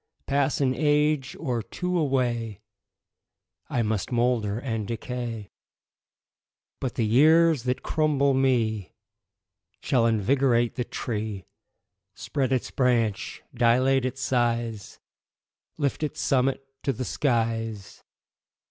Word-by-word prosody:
Pass 140 Hz, 0 st, +1 dB
an 130 Hz, -2 st, +2 dB
age 150 Hz, -1 st, +1 dB
or 120 Hz, -3 st, -1 dB
two 180 Hz, -, -4 dB
away, 120 Hz, -, 0 dB, 1.1 s
I 120 Hz, -, 0 dB
must 110 Hz, 0 st, -2 dB
moulder 120 Hz, -4 st, +1 dB
and 115 Hz, -4 st, -3 dB
decay, 115 Hz, -2 st, -5 dB, 1.3 s
But 130 Hz, -, -3 dB
the 115 Hz, -, +1 dB
years 155 Hz, +4 st, +4 dB
that 125 Hz, 0 st, -1 dB
crumble 145 Hz, -3 st, +2 dB
me 115 Hz, -7 st, 0 dB, 0.9 s
Shall 120 Hz, -3 st, +2 dB
invigorate 120 Hz, +2 st, +2 dB
the 125 Hz, -, -3 dB
tree, 105 Hz, -6 st, -4 dB, 0.7 s
Spread 135 Hz, -3 st, -2 dB
its 130 Hz, -2 st, -1 dB
branch, 115 Hz, -6 st, 0 dB
dilate 125 Hz, +2 st, +3 dB
its 130 Hz, +1 st, -3 dB
size, 115 Hz, -4 st, -1 dB, 0.8 s
Lift 145 Hz, 0 st, -1 dB
its 150 Hz, -, -3 dB
summit 135 Hz, 0 st, +1 dB, 0.2 s
to 135 Hz, -, 0 dB
the 130 Hz, +1 st, -4 dB
skies. 115 Hz, -6 st, -2 dB
125 Hz, 105 wpm, -26 LUFS, 115-135 Hz, 1.3 s, years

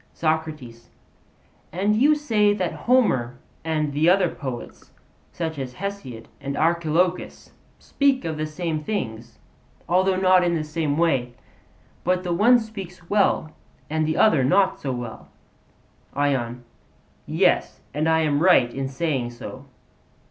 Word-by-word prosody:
SOCRATES: 155 Hz, -7 st, -3 dB, 0.8 s
And 200 Hz, +5 st, +1 dB
you 285 Hz, +7 st, +4 dB
say 215 Hz, -8 st, +2 dB
that 185 Hz, -4 st, -2 dB, 0.2 s
Homer 130 Hz, -, +2 dB, 0.3 s
and 155 Hz, -2 st, -1 dB
the 155 Hz, +4 st, +3 dB
other 185 Hz, -1 st, +4 dB
poets, 120 Hz, -, -7 dB, 0.4 s
such 160 Hz, -3 st, -4 dB
as 125 Hz, -2 st, -6 dB
Hesiod 185 Hz, -, -6 dB
and 140 Hz, +1 st, -5 dB
Archilochus, 170 Hz, +2 st, 0 dB, 0.3 s
speak 275 Hz, -5 st, 0 dB
of 160 Hz, -1 st, -2 dB
the 155 Hz, 0 st, -3 dB
same 155 Hz, -1 st, -3 dB
things, 115 Hz, -, -4 dB, 0.5 s
although 185 Hz, +2 st, +2 dB
not 185 Hz, -1 st, +4 dB
in 175 Hz, -1 st, +1 dB
the 155 Hz, -, -1 dB
same 150 Hz, -1 st, -2 dB
way; 135 Hz, -8 st, +1 dB, 0.7 s
but 180 Hz, +1 st, +1 dB
the 175 Hz, -2 st, -1 dB
one 225 Hz, +8 st, +5 dB
speaks 195 Hz, -6 st, -8 dB
well 195 Hz, -6 st, +2 dB, 0.4 s
and 155 Hz, 0 st, 0 dB
the 155 Hz, -, -1 dB
other 160 Hz, -11 st, +4 dB
not 190 Hz, +9 st, +2 dB
so 135 Hz, -, -3 dB
well? 120 Hz, -, -6 dB, 0.9 s
ION: 125 Hz, -4 st, -1 dB, 0.6 s
Yes; -, -, +1 dB
and 155 Hz, +3 st, 0 dB
I 160 Hz, 0 st, +3 dB
am 145 Hz, -2 st, +1 dB
right 135 Hz, -10 st, +4 dB
in 135 Hz, +1 st, -3 dB
saying 135 Hz, -3 st, -2 dB
so. 130 Hz, +3 st, -9 dB
160 Hz, 135 wpm, -23 LUFS, 135-185 Hz, 0.9 s, one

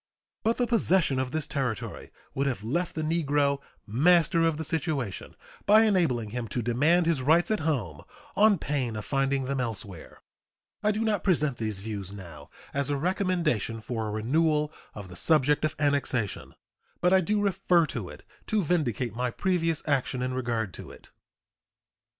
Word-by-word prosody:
But 225 Hz, +1 st, +1 dB
the 245 Hz, -, +2 dB
possession 190 Hz, -, +2 dB
of 130 Hz, -1 st, -1 dB
this 155 Hz, +2 st, -3 dB
territory 125 Hz, -7 st, -4 dB, 0.2 s
would 140 Hz, +1 st, 0 dB
have 120 Hz, -7 st, -2 dB
left 170 Hz, +10 st, -2 dB
the 155 Hz, -, -2 dB
negro 145 Hz, -3 st, +1 dB, 0.3 s
"master 165 Hz, -, +3 dB
of 165 Hz, -2 st, +2 dB
the 160 Hz, -, -3 dB
situation," 145 Hz, -, -3 dB, 0.3 s
by 215 Hz, +2 st, +7 dB
enabling 160 Hz, -, +1 dB
him 120 Hz, 0 st, -4 dB
to 120 Hz, +2 st, -3 dB
demand 150 Hz, +10 st, +3 dB
his 165 Hz, -5 st, +1 dB
rights 160 Hz, +9 st, +3 dB
at 215 Hz, -, +1 dB
home 120 Hz, -, -2 dB, 0.3 s
on 210 Hz, -1 st, +5 dB
pain 135 Hz, -7 st, -2 dB
of 105 Hz, -2 st, -5 dB
finding 135 Hz, 0 st, 0 dB
them 135 Hz, 0 st, -1 dB
elsewhere. 105 Hz, -7 st, -6 dB, 0.6 s
I 210 Hz, -, +2 dB
do 215 Hz, +2 st, 0 dB
not 215 Hz, -2 st, 0 dB
present 150 Hz, -8 st, +1 dB
these 110 Hz, -3 st, -4 dB
views 100 Hz, -2 st, -5 dB
now 85 Hz, -7 st, -11 dB, 0.2 s
as 140 Hz, +1 st, 0 dB
a 145 Hz, -, 0 dB
recommendation 170 Hz, -, 0 dB
for 110 Hz, -1 st, -4 dB
a -, -, -3 dB
renewal 150 Hz, +7 st, +1 dB, 0.2 s
of 100 Hz, -2 st, -8 dB
the 90 Hz, -, -11 dB
subject 150 Hz, -, +3 dB
of 155 Hz, 0 st, 0 dB
annexation, 140 Hz, -7 st, -1 dB, 0.4 s
but 180 Hz, +1 st, +3 dB
I 190 Hz, -, +6 dB
do 210 Hz, +4 st, 0 dB
refer 190 Hz, -4 st, +2 dB
to -, -, -5 dB
it -, -, -12 dB, 0.2 s
to 215 Hz, -3 st, +1 dB
vindicate 130 Hz, -, -1 dB
my 125 Hz, +1 st, -1 dB
previous 165 Hz, +2 st, 0 dB
action 130 Hz, -3 st, 0 dB
in 130 Hz, 0 st, -2 dB
regard 115 Hz, -6 st, -2 dB
to -, -, -9 dB
it. -, -, -15 dB
145 Hz, 170 wpm, -27 LUFS, 120-170 Hz, 0.6 s, by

